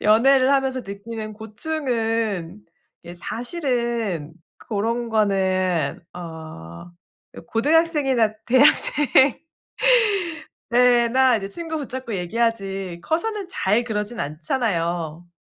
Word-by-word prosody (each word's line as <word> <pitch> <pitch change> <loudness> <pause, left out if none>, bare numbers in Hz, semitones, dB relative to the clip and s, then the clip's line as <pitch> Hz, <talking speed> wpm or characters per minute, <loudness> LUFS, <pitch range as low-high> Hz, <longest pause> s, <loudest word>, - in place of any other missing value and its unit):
연애를 255 +5 +5
하면서 265 -2 +1
느끼는 215 +1 -7
고충은 225 - -2 0.4
예 175 - -9
사실은 235 - -3 0.4
고런 230 +3 -1
거는 185 -7 +1
어 160 - -9 0.5
요 - - -10
고등학생이나 275 -3 +2
대학생 260 +4 +5 1.8
때나 245 +1 +4
이제 195 -2 -4
친구 325 +6 -5
붙잡고 260 -5 -5
얘기하지 195 -2 -2
커서는 395 - -2
잘 210 - +1
그러진 220 0 -3
않잖아요. 170 - -2
225 Hz, 215 characters per minute, -22 LUFS, 185-255 Hz, 1.8 s, 연애를